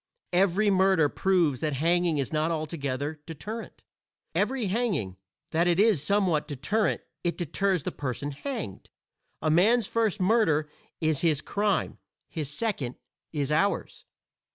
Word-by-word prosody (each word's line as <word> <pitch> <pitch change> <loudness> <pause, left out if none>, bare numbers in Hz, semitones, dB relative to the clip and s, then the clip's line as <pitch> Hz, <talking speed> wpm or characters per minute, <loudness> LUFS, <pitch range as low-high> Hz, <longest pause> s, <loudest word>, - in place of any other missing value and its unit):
Every 195 +3 +3
murder 190 -5 +4
proves 175 -9 +2
that 155 -2 0
hanging 170 +3 +2
is 140 +2 -2
not 155 +1 +1
altogether 150 -2 -3
deterrent; 210 +9 -7 0.5
every 260 -4 0
hanging, 190 - -1 0.4
that 170 +2 +2
it 175 +1 +3
is 210 -8 +4
somewhat 175 -3 +1
deterrent 160 - 0 0.2
it 175 - -1
deters 180 +1 0
the - - -2
person 145 +1 -4
hanged. 220 - -6 0.5
A 155 - +2
man's 215 +8 +4
first 220 -1 0
murder 180 -7 +3 0.3
is 155 -3 +1
his 155 -4 +2
crime, 205 +1 -1 0.3
his 155 -5 -4
second 150 - -2 0.4
is 145 -2 -1
ours. 195 +7 0
170 Hz, 130 wpm, -27 LUFS, 150-200 Hz, 0.5 s, murder